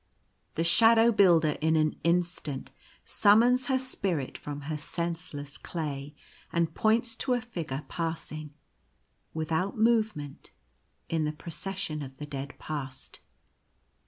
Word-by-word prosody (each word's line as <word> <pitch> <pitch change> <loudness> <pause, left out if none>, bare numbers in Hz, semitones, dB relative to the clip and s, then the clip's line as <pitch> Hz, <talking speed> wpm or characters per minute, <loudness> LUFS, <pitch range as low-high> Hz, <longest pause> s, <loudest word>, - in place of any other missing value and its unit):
The 165 - +1
Shadow 225 +6 +6
Builder 170 -7 +4
in 160 +1 +3
an 155 -1 +2
instant 170 -5 -1 0.3
summons 240 +5 +4
her 265 - +3
spirit 195 - -2
from 145 0 -6
her 155 +2 -3
senseless 160 -2 -4
clay, 145 -3 -5 0.4
and 170 -1 +1
points 230 +1 +2
to 260 - +1
a - - 0
figure 165 - -5
passing, 160 -3 -4 0.8
without 160 +6 -1
movement, 220 -11 +1 0.6
in 160 -2 0
the 150 - 0
Procession 170 0 -4
of 135 -1 -8
the 150 - -6
Dead 140 -1 -6
Past. 135 -4 -6
165 Hz, 120 wpm, -29 LUFS, 150-205 Hz, 0.8 s, Shadow